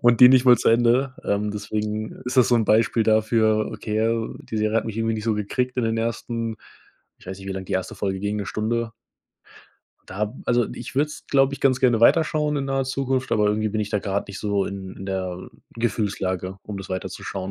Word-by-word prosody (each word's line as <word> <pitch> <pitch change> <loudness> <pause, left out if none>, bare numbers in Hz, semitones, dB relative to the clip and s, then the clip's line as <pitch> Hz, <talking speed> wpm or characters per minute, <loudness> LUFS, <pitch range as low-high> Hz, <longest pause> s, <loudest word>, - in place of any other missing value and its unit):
und 120 -1 +4
die 125 - +11
nicht 130 0 +5
mal 125 -2 +8
zu - - +1
Ende, 120 +3 +3
ähm, 105 +1 0
deswegen 105 +1 -3
ist 125 +2 -4
das 125 -3 +6
so 125 - +4
'n 115 -2 +3
Beispiel 115 +2 +3
dafür, 110 0 +2
okay, 110 0 -3
al 115 0 -1
die 110 - -7
Serie 110 +1 +1
hat 115 - +1
mich 110 -2 -5
irgendwie 115 0 0
nicht 110 - -5
so 115 -2 +1
gekriegt 125 +5 -2
in 125 - +1
den 115 0 0
ersten 115 0 -3 0.6
ich - - -19
weiß 95 +1 -6
nicht, 95 - -11
wie - - -2
lang 95 0 -5
die - - -6
1. 95 -1 -2
Folge 95 -1 -2
ging, 105 +1 -2
'ne 100 -2 -3
Stunde? 115 +2 -2 1.1
Da 105 +4 -3
also, 120 -2 +2
ich 120 - -8
würde 145 +2 +3
es, 150 - -11
glaube 135 0 +3
ich, - - -12
ganz 130 -2 +3
gerne 120 -4 +3
weiterschauen 150 +3 +3
in 140 - -1
naher 135 0 0
Zukunft, 130 0 -1
aber 105 -1 +3
irgendwie 110 +1 +1
bin 110 +1 -2
ich 105 - -2
da 105 - 0
grade 100 0 -2
nicht 100 - -7
so 100 -2 0
in 95 -1 -6
in 95 - -8
der 95 -2 -3 0.4
Gefühlslage, 100 -5 -2
um 105 - -6
das 95 0 -7
weiterzuschauen 95 0 -5
110 Hz, 225 wpm, -23 LUFS, 105-120 Hz, 1.1 s, die